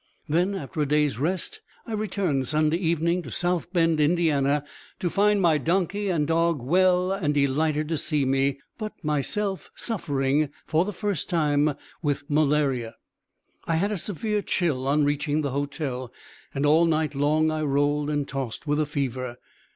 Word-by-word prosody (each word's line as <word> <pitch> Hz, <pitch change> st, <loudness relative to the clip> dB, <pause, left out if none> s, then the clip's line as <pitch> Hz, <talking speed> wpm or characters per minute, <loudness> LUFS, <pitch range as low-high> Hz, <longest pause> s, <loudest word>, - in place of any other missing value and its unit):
Then, 175 Hz, +6 st, +1 dB
after 155 Hz, -3 st, -4 dB
a 145 Hz, -, +1 dB
day's 150 Hz, -3 st, +1 dB
rest, 185 Hz, -, -2 dB, 0.2 s
I 225 Hz, -, -6 dB
returned 195 Hz, -, -1 dB
Sunday 155 Hz, +1 st, +2 dB
evening 170 Hz, 0 st, +1 dB
to -, -, -9 dB
South 175 Hz, -1 st, 0 dB
Bend, 165 Hz, -3 st, +2 dB
Ind., 150 Hz, +4 st, +3 dB
to 145 Hz, +1 st, -1 dB
find 205 Hz, +1 st, +3 dB
my 165 Hz, -5 st, +3 dB
donkey 190 Hz, +6 st, 0 dB
and 160 Hz, -5 st, +1 dB
dog 165 Hz, 0 st, +2 dB
well 180 Hz, +7 st, +3 dB
and 165 Hz, -7 st, 0 dB
delighted 150 Hz, +2 st, +1 dB
to 160 Hz, -3 st, 0 dB
see 150 Hz, -4 st, 0 dB
me, 135 Hz, +1 st, +1 dB, 0.2 s
but 215 Hz, -1 st, -4 dB
myself 185 Hz, +7 st, -1 dB
suffering, 145 Hz, -, 0 dB, 0.2 s
for 160 Hz, +2 st, +2 dB
the 210 Hz, -, -3 dB
first, 205 Hz, -1 st, -3 dB, 0.7 s
with 145 Hz, -2 st, -1 dB
malaria. 145 Hz, -6 st, +1 dB, 0.7 s
I 165 Hz, -, 0 dB
had 200 Hz, +6 st, +1 dB
a 210 Hz, -, -1 dB
severe 210 Hz, +4 st, -2 dB
chill 145 Hz, -10 st, -1 dB
on 145 Hz, +2 st, +3 dB
reaching 145 Hz, +1 st, 0 dB
the 140 Hz, -3 st, -2 dB
hotel, 135 Hz, -3 st, -3 dB, 0.4 s
and 140 Hz, +1 st, -1 dB
all 155 Hz, +3 st, +5 dB
night 155 Hz, -2 st, +1 dB
long 155 Hz, +3 st, +2 dB
I 155 Hz, 0 st, -2 dB
rolled 145 Hz, 0 st, +1 dB
and 145 Hz, -2 st, -1 dB
tossed 135 Hz, 0 st, -5 dB
with 150 Hz, 0 st, +1 dB
a 155 Hz, -, +1 dB
fever. 130 Hz, -4 st, -3 dB
155 Hz, 160 wpm, -25 LUFS, 145-175 Hz, 0.7 s, all